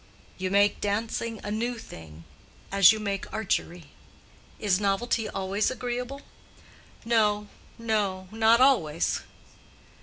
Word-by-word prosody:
"You 185 0 -1
make 200 +1 +3
dancing 225 +2 -2
a 205 - -4
new 235 +3 -2
thing, 80 - -12 0.5
as 195 0 +7
you 220 - -2
make 200 -2 -4
archery." 180 -7 -3 0.7
"Is 200 -3 +1
novelty 210 +2 0
always 195 +2 -1
agreeable?" 250 +2 -4 0.8
"No, 210 -3 +2 0.3
no—not 220 0 +1
always." 165 - +2
210 Hz, 100 wpm, -27 LUFS, 195-230 Hz, 0.8 s, as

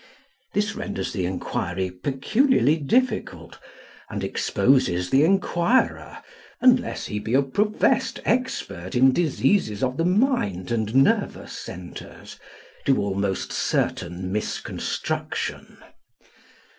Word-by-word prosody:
This - - +1
renders - - -4
the 90 - -1
enquiry 90 0 -3
peculiarly 145 - +2
difficult, 245 - -1 0.5
and - - -4
exposes 90 -10 +1
the 135 +2 +5
enquirer, 195 +6 +1 0.4
unless 250 -2 +3
he 105 - -3
be 110 +4 -1
a 140 - +4
professed 210 +11 +1
expert 95 - -2
in 130 +2 +6
diseases 140 - +1
of 130 +1 0
the 165 - +1
mind 180 - +1
and 110 0 -1
nervous 135 +1 +2
centres, 90 0 -9 0.5
to 135 - +4
almost 100 -1 -2
certain 90 +1 -1
misconstruction. 105 +2 -3
130 Hz, 100 wpm, -24 LUFS, -, 0.5 s, in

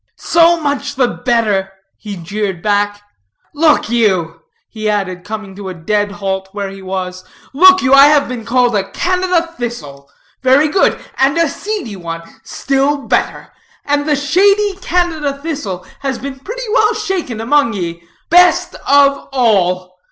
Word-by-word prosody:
"So 335 0 +3
much 285 -1 -2
the 260 -2 +2
better," 220 -7 0 0.2
he 205 -2 -8
jeered 190 +1 -4
back. 205 0 0 0.5
"Look 305 +1 +3
you," 190 -8 0 0.3
he 215 -1 -4
added, 185 -4 -2
coming 210 -2 -7
to 195 -1 -7
a 185 - -7
dead 205 +4 -1
halt 190 -1 -4
where 200 -1 -4
he 195 0 -10
was; 185 -1 -5 0.3
"look 370 +5 +6
you, 265 0 +3
I 275 +1 +9
have 295 -1 +3
been 245 -2 -6
called 245 -1 +1
a 195 -1 -1
Canada 360 -2 0
thistle. 145 - -6 0.3
Very 270 +4 +4
good. 380 - +2 0.2
And 275 +3 +2
a 335 -1 +3
seedy 390 - -5
one: 165 -1 -6 0.2
still 275 +1 0
better. - - -1 0.3
And 290 +1 0
the 295 - +3
seedy 390 +8 +2
Canada 330 -6 -1
thistle 275 - -5
has 270 -2 -3
been 270 0 -7
pretty 485 - -6
well 435 -2 +3
shaken 380 - -3
among 235 +1 +2
ye: 170 -4 -5 0.3
best 355 +1 +4
of 280 0 +3
all. 185 -7 0
245 Hz, 150 wpm, -15 LUFS, 195-300 Hz, 0.5 s, I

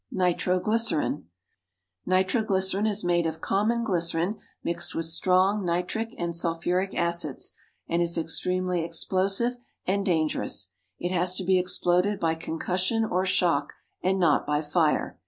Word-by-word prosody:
=Nitroglycerine.= 180 - +1 0.8
Nitroglycerine 190 +1 +2
is 210 -1 +1
made 175 -1 +2
of 160 0 -4
common 225 +4 +1
glycerine 175 0 0 0.2
mixed 170 0 -2
with 165 - -1
strong 185 +5 +2
nitric 180 +6 -2
and 170 -1 -2
sulphuric 175 +3 -1
acids, 170 -5 -1 0.4
and 170 +1 0
is 170 0 +1
extremely 180 +2 0
explosive 195 +8 0 0.3
and 200 +2 0
dangerous. 155 - 0 0.3
It 175 - -3
has 180 0 +1
to 185 - +1
be 185 0 +3
exploded 180 +2 +1
by 160 -1 +1
concussion 180 +7 -1
or 185 -2 0
shock, 165 -6 +1 0.3
and 190 +1 +1
not 165 -7 +2
by 150 +1 +1
fire. 155 0 0
180 Hz, 130 wpm, -26 LUFS, 170-190 Hz, 0.8 s, be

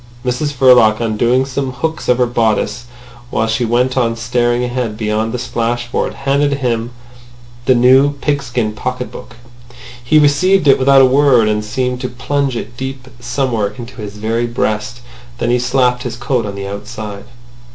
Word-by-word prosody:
Mrs 125 +4 -1
Verloc, 125 -4 +5
undoing 120 +3 +1
some 135 -1 -3
hooks 160 +5 -3
of 125 - +4
her 125 - +3
bodice, 115 -1 0 0.4
while 110 - 0
she 115 +2 0
went 125 +3 +1
on 115 -3 +1
staring 120 +1 0
ahead 120 -3 -3
beyond 110 0 -1
the 125 - -3
splashboard, 120 0 -2
handed 140 +1 +1
over 140 - 0
to 140 - -9
him 120 -1 -1 0.8
the 130 - +5
new 130 +4 +5
pigskin 135 -6 -2
pocket 125 +3 -4
book. 110 - -11 0.7
He 150 +6 +3
received 150 +4 +3
it 135 - +5
without 135 0 +5
a - - +7
word, 130 -4 +4
and 105 0 0
seemed 125 +3 -2
to 125 - -3
plunge 135 +1 -2
it 115 +1 -7
deep 130 0 -6
somewhere 120 -4 -2
into 120 0 -9
his 105 0 -7
very 115 +3 -1
breast. 115 +1 -2 0.4
Then 120 - -1
he 125 - +2
slapped 125 0 +1
his 125 -2 -5
coat 125 -3 -1
on 100 - -6
the 100 0 -5
outside. 105 0 -7
125 Hz, 170 wpm, -16 LUFS, 115-130 Hz, 0.8 s, a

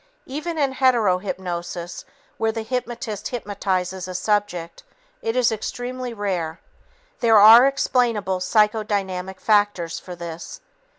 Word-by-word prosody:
Even 310 +5 -5
in 280 -3 +1
hetero 240 -9 +3
hypnosis, 175 -2 -5 0.3
where 225 0 +1
the 225 0 -4
hypnotist 230 -3 -4
hypnotizes 190 -5 -3
a 185 - -6
subject, 180 - -1 0.4
it 225 +1 -2
is 250 -2 +3
extremely 245 +3 -4
rare. 185 -7 -3 0.6
There 225 -2 +5
are 225 +5 +9
explainable 235 -8 +1
psychodynamic 195 -2 0
factors 205 -6 +1
for 180 - -9
this. 170 - -8
210 Hz, 115 wpm, -22 LUFS, 185-240 Hz, 0.6 s, are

